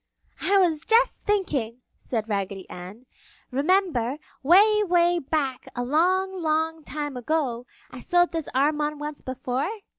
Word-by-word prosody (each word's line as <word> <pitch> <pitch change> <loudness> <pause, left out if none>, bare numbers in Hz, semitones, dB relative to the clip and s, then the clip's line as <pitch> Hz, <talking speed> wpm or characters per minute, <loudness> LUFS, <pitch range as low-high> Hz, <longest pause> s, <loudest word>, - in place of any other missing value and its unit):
"I 400 +1 +3
was 330 -5 +2
just 470 +3 +2
thinking!" 275 - -1
said 225 -3 -4
Raggedy 195 -2 -3
Ann. 190 +7 -10 0.5
"Remember, 285 -3 +1 0.2
'way, 415 +8 +5
'way 350 -2 +3
back, 275 -3 -2
a 245 - -2
long, 370 +7 +2
long 320 0 0
time 290 -2 -5
ago, 250 -2 -2 0.2
I 255 - -9
sewed 350 +5 +2
this 325 -3 -3
arm 295 +3 +2
on 300 0 -1
once 295 0 -6
before?" 260 +3 -3
300 Hz, 140 wpm, -25 LUFS, 255-350 Hz, 0.5 s, way